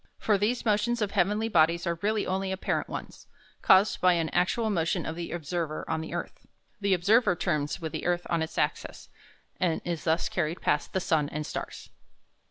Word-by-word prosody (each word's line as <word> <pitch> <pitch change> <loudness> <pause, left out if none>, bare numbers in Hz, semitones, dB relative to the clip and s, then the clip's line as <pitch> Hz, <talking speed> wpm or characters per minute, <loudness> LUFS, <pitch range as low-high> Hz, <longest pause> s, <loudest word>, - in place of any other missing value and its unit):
For 215 - +2
these 235 +5 0
motions 215 +3 +1
of 210 -2 0
the - - -14
heavenly 210 +3 +1
bodies 170 -4 +3
are 170 -1 -2
really 210 +1 0
only 190 +1 -1
apparent 190 - -2
ones, - - -8 0.3
caused 190 +3 +4
by 180 0 +5
an 165 -2 0
actual 215 +5 +1
motion 170 -1 0
of 160 - -4
the 170 0 -5
observer 165 -1 -3
on 160 - -1
the 160 - -7
earth. - - -6 0.3
The 200 -2 +2
observer 200 +3 +3
turns 155 -4 -1
with 160 -2 -5
the 160 +1 -4
earth 175 0 0
on 165 -1 0
its 160 - -4
axis, - - -2 0.5
and 175 -4 +1
is 170 -2 -3
thus 160 +1 +1
carried 170 0 -2
past 150 - 0
the 190 - +1
sun 155 -4 +1
and 150 0 -4
stars. - - -6
175 Hz, 195 wpm, -28 LUFS, 160-200 Hz, 0.5 s, by